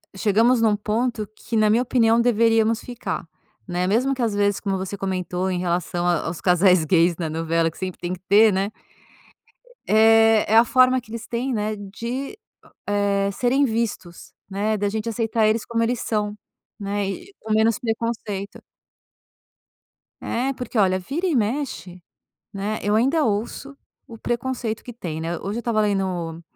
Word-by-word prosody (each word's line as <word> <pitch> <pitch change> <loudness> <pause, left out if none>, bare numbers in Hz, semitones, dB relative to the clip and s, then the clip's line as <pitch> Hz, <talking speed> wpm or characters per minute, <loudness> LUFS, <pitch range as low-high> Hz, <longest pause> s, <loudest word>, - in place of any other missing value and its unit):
chegamos 225 +5 +3
num 220 -2 +3
ponto 215 +1 -2
que 230 - -4
na 215 0 +4
minha 225 +3 +3
opinião 235 -2 +3
deveríamos 225 -1 +3
ficar, 245 -2 -5 0.4
né, 180 0 -1
mesmo 250 +7 +2
que 255 - -4
às 225 -3 0
vezes 205 -1 +1
como 195 -2 -2
você 190 +1 -4
comentou 185 -1 -2
em 180 - -1
relação 175 0 -1
a 175 -3 +1
aos 165 +1 -4
casais 180 -2 +4
gays 170 0 +3
na 165 -3 -3
novela 165 +1 0
que - - -18
sempre 185 -1 -5
tem 175 +1 -3
que 180 - -8
ter, 210 +1 +6
né. 195 +2 -1 1.2
É 225 0 +5
é 220 - +6
a 230 - +7
forma 255 +1 +4
que 230 - -17
eles 230 0 -7
têm, 250 +3 -2
né, 215 -1 -1
de, 235 - -6 0.5
eh, 200 -1 +1
serem 255 +7 +2
vistos 220 -7 -4 0.2
né 210 +2 -1
da 205 0 0
gente 220 +2 -4
aceitar 225 -1 +1
eles 220 +1 0
como 230 -1 -1
eles 240 +1 0
são, 210 -2 -2 0.4
né, 200 0 -2
e 380 - -8
com 220 - -7
menos 220 0 +3
preconceito. 225 -3 -3 1.6
Eh, 260 +4 -1
porque 250 -2 -6
olha 185 -2 +3
vira 310 - -3
e 325 - +1
mexe, 220 -6 -2 0.5
né, 205 +2 -3
eu 205 +1 +1
ainda 275 +7 +2
ouço 235 +6 -3 0.3
o 230 - -10
preconceito 240 -1 -3
que 245 - -9
tem, 170 -9 -6
né, 165 +1 -3
hoje 205 +4 -4
eu - - -2
estava 230 -2 0
lendo 185 -5 -1
215 Hz, 170 wpm, -23 LUFS, 190-235 Hz, 1.6 s, a